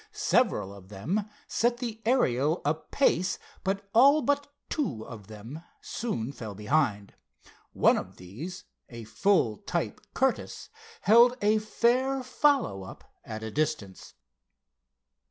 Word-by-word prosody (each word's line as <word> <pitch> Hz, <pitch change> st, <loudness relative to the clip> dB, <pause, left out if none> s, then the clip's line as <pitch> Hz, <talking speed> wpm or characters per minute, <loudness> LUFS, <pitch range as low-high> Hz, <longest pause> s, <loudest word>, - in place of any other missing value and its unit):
Several 100 Hz, -1 st, +1 dB
of 95 Hz, -1 st, -14 dB
them 170 Hz, -, -2 dB, 0.2 s
set 240 Hz, +1 st, +1 dB
the 230 Hz, -3 st, -5 dB
Ariel 155 Hz, -, +2 dB
a 145 Hz, -, +3 dB
pace, 185 Hz, -, 0 dB, 0.3 s
but 195 Hz, +1 st, -2 dB
all 280 Hz, +6 st, +6 dB
but 285 Hz, 0 st, +1 dB, 0.2 s
two 150 Hz, -, -2 dB
of 105 Hz, -5 st, -10 dB
them 110 Hz, +8 st, -9 dB, 0.2 s
soon 135 Hz, -, -3 dB
fell 110 Hz, -7 st, -8 dB
behind. 105 Hz, -2 st, 0 dB, 0.6 s
One -, -, +4 dB
of -, -, -6 dB
these, 125 Hz, -, -8 dB, 0.3 s
a 115 Hz, -2 st, -8 dB
full 115 Hz, -, +2 dB
type -, -, -3 dB
Curtiss, -, -, -1 dB, 0.3 s
held 235 Hz, +5 st, +6 dB
a 210 Hz, +1 st, +3 dB
fair 255 Hz, +5 st, +1 dB
follow 255 Hz, -, +2 dB
up 95 Hz, -, -10 dB, 0.2 s
at 110 Hz, 0 st, -7 dB
a 110 Hz, -, -5 dB
distance. 150 Hz, -11 st, -3 dB
160 Hz, 125 wpm, -28 LUFS, -, 0.6 s, all